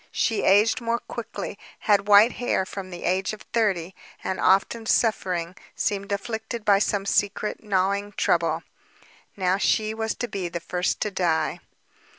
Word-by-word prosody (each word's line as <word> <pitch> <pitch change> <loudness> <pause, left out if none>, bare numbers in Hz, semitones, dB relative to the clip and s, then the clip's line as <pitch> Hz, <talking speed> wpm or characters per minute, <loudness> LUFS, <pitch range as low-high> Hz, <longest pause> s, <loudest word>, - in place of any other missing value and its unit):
She 225 - 0
aged 210 +5 +4
more 230 0 0
quickly, 230 -3 -7 0.2
had 205 -1 +2
white 210 +3 +7
hair 245 -6 -1
from 190 0 -7
the 175 -1 -8
age 190 +3 0
of 215 - -9
thirty, 190 -6 +1 0.3
and 190 - -2
often 210 +4 +2
suffering, 180 -8 +1 0.2
seemed 200 0 -2
afflicted 220 +2 -4
by 200 -1 +5
some 205 -1 0
secret, 205 +1 0
gnawing 200 0 0
trouble. 165 -3 +1 0.7
Now 185 0 +1
she 215 +1 +1
was 220 0 -2
to 245 - -3
be 195 -5 -4
the 170 - -4
first 180 +2 -2
to 210 - 0
die. 165 -5 0
200 Hz, 155 wpm, -25 LUFS, 185-215 Hz, 0.7 s, white